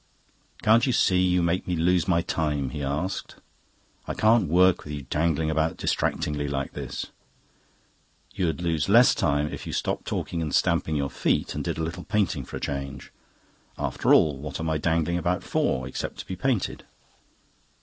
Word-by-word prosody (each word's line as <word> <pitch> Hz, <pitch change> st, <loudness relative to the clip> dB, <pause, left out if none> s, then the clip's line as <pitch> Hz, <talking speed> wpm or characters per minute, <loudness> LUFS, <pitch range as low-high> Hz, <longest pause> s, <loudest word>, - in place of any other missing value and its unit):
"Can't 115 Hz, +4 st, +5 dB
you 130 Hz, -, +2 dB
see 90 Hz, -4 st, +3 dB
you 90 Hz, -1 st, +2 dB
make 85 Hz, +2 st, 0 dB
me 90 Hz, -, 0 dB
lose 90 Hz, +2 st, +2 dB
my 85 Hz, -2 st, +2 dB
time?" 75 Hz, -6 st, -1 dB
he 75 Hz, -, -5 dB
asked. 75 Hz, +7 st, -3 dB, 0.7 s
"I -, -, -3 dB
can't 110 Hz, -5 st, +3 dB
work 90 Hz, +2 st, +4 dB
with 75 Hz, -, -7 dB
you 70 Hz, -2 st, -5 dB
dangling 80 Hz, +2 st, 0 dB
about 80 Hz, +1 st, 0 dB
distractingly 75 Hz, -1 st, -1 dB
like 70 Hz, -1 st, -3 dB
this." -, -, -6 dB, 1.2 s
"You'd 85 Hz, -1 st, -1 dB
lose 80 Hz, -1 st, 0 dB
less 120 Hz, +4 st, +7 dB
time 75 Hz, +1 st, 0 dB
if -, -, -7 dB
you -, -, -5 dB
stopped -, -, -2 dB
talking 85 Hz, -, -3 dB
and 75 Hz, -3 st, -1 dB
stamping 80 Hz, -, +1 dB
your 70 Hz, -2 st, -1 dB
feet -, -, 0 dB
and -, -, -3 dB
did -, -, -3 dB
a 80 Hz, -, -2 dB
little 85 Hz, +2 st, -4 dB
painting 95 Hz, -, 0 dB
for -, -, -7 dB
a -, -, -6 dB
change. 70 Hz, -1 st, -5 dB, 0.7 s
After -, -, 0 dB
all, 75 Hz, -3 st, +5 dB
what 75 Hz, +1 st, -6 dB
am 80 Hz, 0 st, -1 dB
I 80 Hz, -, 0 dB
dangling 85 Hz, +2 st, +1 dB
about 90 Hz, +2 st, -1 dB
for, 65 Hz, 0 st, 0 dB
except 65 Hz, -, -5 dB
to -, -, -7 dB
be 95 Hz, -, -5 dB
painted?" 120 Hz, +2 st, -1 dB
80 Hz, 180 wpm, -26 LUFS, 75-90 Hz, 1.2 s, less